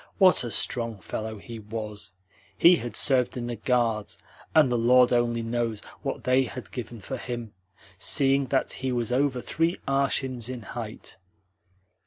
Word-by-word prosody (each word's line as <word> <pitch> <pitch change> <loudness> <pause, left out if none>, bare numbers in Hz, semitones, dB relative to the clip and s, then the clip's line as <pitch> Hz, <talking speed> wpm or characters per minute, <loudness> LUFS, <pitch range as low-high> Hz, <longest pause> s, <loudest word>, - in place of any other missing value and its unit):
What 185 - +5
a 120 - -3
strong 115 -1 -1
fellow 110 +5 -5
he 115 +3 -9
was! 105 -2 -6 0.5
He 175 +1 +7
had 120 -6 -6
served 130 -2 +1
in 120 - -3
the 120 0 -3
Guards, 115 -2 0 0.4
and 150 -5 +6
the - - +2
Lord 125 +1 +5
only 120 -1 +1
knows 115 -2 -2 0.2
what - - -4
they 130 +1 +3
had 125 0 -8
given 120 -3 -7
for 130 +7 -5
him, 120 -3 -6 0.5
seeing 135 0 +4
that - - 0
he 130 0 -3
was 120 -2 -1
over 130 0 +1
three 165 +3 0
arshins 135 -3 0
in 125 -3 -6
height." 110 +1 -8
120 Hz, 160 wpm, -26 LUFS, 115-130 Hz, 0.5 s, He